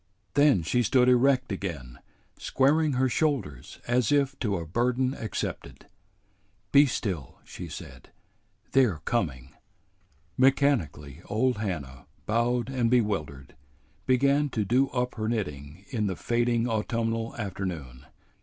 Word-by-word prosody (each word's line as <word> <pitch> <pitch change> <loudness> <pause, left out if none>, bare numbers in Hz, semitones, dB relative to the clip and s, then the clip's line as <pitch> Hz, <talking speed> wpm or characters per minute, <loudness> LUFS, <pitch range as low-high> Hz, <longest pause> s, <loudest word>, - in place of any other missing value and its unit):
Then 145 - +4
she 120 +9 +1
stood 125 +2 +3
erect 130 0 +3
again, 80 -11 -5 0.4
squaring 150 +3 +2
her 130 +1 +2
shoulders 130 - -2
as 120 -2 +2
if 140 -1 +2
to 105 -5 0
a 85 - -5
burden 125 - 0
accepted. 110 -6 -5 0.9
"Be 140 +1 +7
still," 90 - -4
she - - -9
said. - - -10 0.6
"They're 120 - +3
coming." 70 - -2 0.9
Mechanically 120 - +1
old 120 +3 +1
Hannah, 75 - -5 0.2
bowed 120 +1 +1
and 125 -3 0
bewildered, 100 - -1 0.5
began 140 +3 +3
to 110 -5 -2
do 130 +6 +2
up 125 -1 -2
her 110 -1 -3
knitting 80 -5 -4
in 110 -4 -1
the 95 - -2
fading 120 +3 0
autumnal 115 0 -2
afternoon. 90 -11 -5
115 Hz, 120 wpm, -27 LUFS, 90-130 Hz, 0.9 s, Be